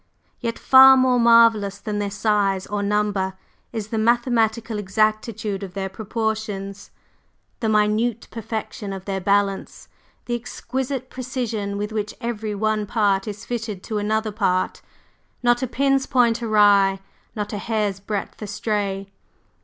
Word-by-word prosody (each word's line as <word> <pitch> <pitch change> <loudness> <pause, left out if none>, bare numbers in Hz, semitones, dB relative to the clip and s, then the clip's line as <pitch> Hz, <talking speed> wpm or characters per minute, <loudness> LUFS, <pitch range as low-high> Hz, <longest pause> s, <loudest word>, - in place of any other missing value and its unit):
Yet 230 0 -3
far 265 0 +8
more 255 -1 +3
marvellous 230 -4 +5
than 210 0 -4
their 205 -1 -1
size 200 -2 0
or 205 0 -3
number 205 -2 0 0.4
is 220 -3 -5
the 225 - -1
mathematical 230 -1 +1
exactitude 215 +1 -1
of 190 -2 -8
their 195 -1 -3
proportions, 210 -2 -4 0.7
the 220 - 0
minute 215 +2 +1
perfection 220 -2 -5
of 190 -1 -8
their 195 -1 -3
balance, 200 +1 0 0.4
the 240 - -3
exquisite 260 +2 -4
precision 235 -6 -3
with 210 +1 -3
which 215 -1 -3
every 220 -3 -3
one 215 0 0
part 200 -2 +1
is 205 -1 -6
fitted 225 -5 -4
to 215 -2 -3
another 215 +1 -1
part, 185 -3 0 0.6
not 240 0 +3
a 260 - -1
pin's 270 +1 +1
point 240 -2 +2
awry, 205 -3 +4 0.4
not 210 -1 -4
a 205 - -3
hair's 210 -3 -1
breadth 200 +1 -5
astray. 205 -2 -2
215 Hz, 140 wpm, -22 LUFS, 200-230 Hz, 0.7 s, far